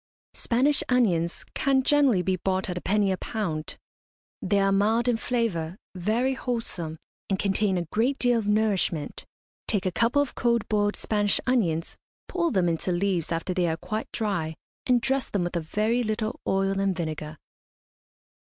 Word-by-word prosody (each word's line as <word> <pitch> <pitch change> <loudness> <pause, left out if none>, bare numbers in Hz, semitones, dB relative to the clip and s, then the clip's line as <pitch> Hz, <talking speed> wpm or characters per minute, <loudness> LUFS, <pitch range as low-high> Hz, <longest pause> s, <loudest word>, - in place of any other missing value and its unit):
Spanish 270 +5 +2
onions 180 -10 +1
can 270 -1 +2
generally 270 -10 +4
be 185 +1 +1
bought 190 +1 -1
at - - -4
a - - -16
penny 200 0 +2
a 190 - 0
pound. 165 -10 -3 0.6
They 200 +2 +2
are 195 0 +3
mild 220 +5 +2
in 240 -2 +3
flavour, 205 -9 -1 0.2
very 220 +8 0
wholesome, 230 -11 -3 0.3
and 195 - +1
contain 195 0 +1
a 175 - 0
great 235 - 0
deal 245 -2 +2
of 210 - -4
nourishment. 205 -8 0 0.4
Take 205 -4 -1
a 185 - +1
couple 235 +8 +2
of 285 -2 0
cold 235 -2 +1
boiled 205 -1 +1
Spanish 205 -2 +1
onions, 175 -11 0 0.3
pull 340 -2 0
them 185 - +2
into 170 +2 -1
leaves 175 -2 0
after 165 +3 -1
they 180 -1 +1
are 160 0 -1
quite 215 +6 -4
dry, 175 -8 -2 0.3
and 250 -2 +4
dress 270 +1 0
them 200 -3 0
with 175 0 -3
a 170 - 0
very 215 +9 0
little 215 -1 -2
oil 195 0 +1
and 195 -1 +1
vinegar. 155 -2 -4
205 Hz, 170 wpm, -26 LUFS, 180-235 Hz, 0.6 s, generally